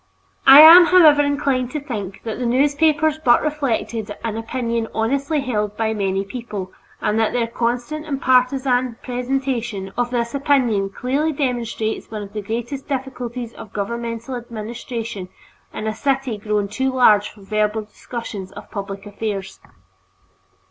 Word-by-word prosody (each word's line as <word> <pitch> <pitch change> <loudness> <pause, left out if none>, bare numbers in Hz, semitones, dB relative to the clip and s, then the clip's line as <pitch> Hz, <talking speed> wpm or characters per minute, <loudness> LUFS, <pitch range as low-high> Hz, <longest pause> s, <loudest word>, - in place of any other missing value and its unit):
I 275 +2 +11
am, 340 +3 +11
however, 315 -5 +7
inclined 280 -3 0
to 300 - -1
think 210 -9 -6
that 225 0 -5
the 250 - -2
newspapers 295 +4 +2
but 240 -2 +5
reflected 255 -7 -2
an 225 -2 -2
opinion 230 0 -2
honestly 275 +7 0
held 210 -5 -2
by 220 -1 0
many 195 -2 -1
people, 205 -5 -6 0.3
and 210 +1 +1
that 225 - +1
their 240 -1 +1
constant 245 +7 -3
and 275 -3 -2
partisan 255 -1 +2
presentation 245 -6 -3
of 245 0 0
this 235 -1 -2
opinion 255 -8 +1
clearly 270 +9 -1
demonstrates 240 -6 -2
one 215 -1 -5
of 200 - -11
the 210 - -3
greatest 240 +6 -5
difficulties 250 -4 -4
of 205 - -12
governmental 230 +4 -4
administration 230 -3 -6 0.4
in 215 - -6
a 220 - -1
city 265 -1 -1
grown 210 -1 -1
too 260 +6 -1
large 215 -5 +4
for 205 - -17
verbal 215 +1 0
discussions 210 -3 -7
of 205 0 -11
public 200 -1 -6
affairs. 205 -2 -5
235 Hz, 145 wpm, -20 LUFS, 215-270 Hz, 0.4 s, I